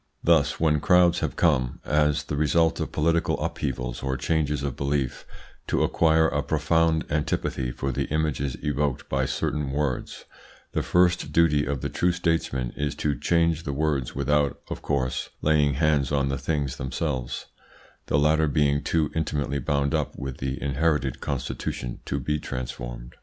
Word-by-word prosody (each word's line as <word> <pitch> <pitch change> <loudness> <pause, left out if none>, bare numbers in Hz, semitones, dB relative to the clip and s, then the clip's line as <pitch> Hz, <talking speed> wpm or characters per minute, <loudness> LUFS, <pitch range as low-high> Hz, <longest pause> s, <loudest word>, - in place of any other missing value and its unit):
Thus, - - +3
when 75 -2 +3
crowds 90 +1 +4
have - - -2
come, 65 -7 +1
as 75 0 +2
the 75 - -4
result 80 +2 +2
of - - -3
political 85 +2 +1
upheavals 60 -3 -3
or 65 0 -1
changes 75 0 0
of 70 -3 -2
belief, 70 -1 -2 0.4
to - - +1
acquire 80 0 +3
a 70 -2 0
profound 80 +2 +1
antipathy 75 -3 -1
for 70 +2 -3
the - - -1
images 75 -3 -1
evoked 75 -3 -1
by 65 0 0
certain 75 +1 -1
words, 70 -2 -2 0.5
the - - 0
first 90 -1 +2
duty 75 -3 +3
of 70 -3 -2
the - - -2
true 90 - +1
statesman 80 -8 -1
is 75 -1 -2
to 75 - 0
change 85 +1 +1
the 70 -4 -4
words 70 -3 -1
without, 70 +1 +1
of - - -4
course, 65 -2 -1
laying 75 -3 +3
hands 75 -2 +2
on 70 -1 +1
the 70 - -1
things 70 -2 -2
themselves, 65 -1 -3 0.6
the - - +2
latter 75 +2 +3
being 70 0 +2
too 80 -3 +1
intimately 75 -3 -1
bound 70 +1 0
up - - -1
with 65 -1 -5
the 65 0 -3
inherited 70 -1 0
constitution 65 -3 -4
to 70 - -2
be 75 +3 -1
transformed. - - -6
75 Hz, 160 wpm, -25 LUFS, 70-80 Hz, 0.6 s, crowds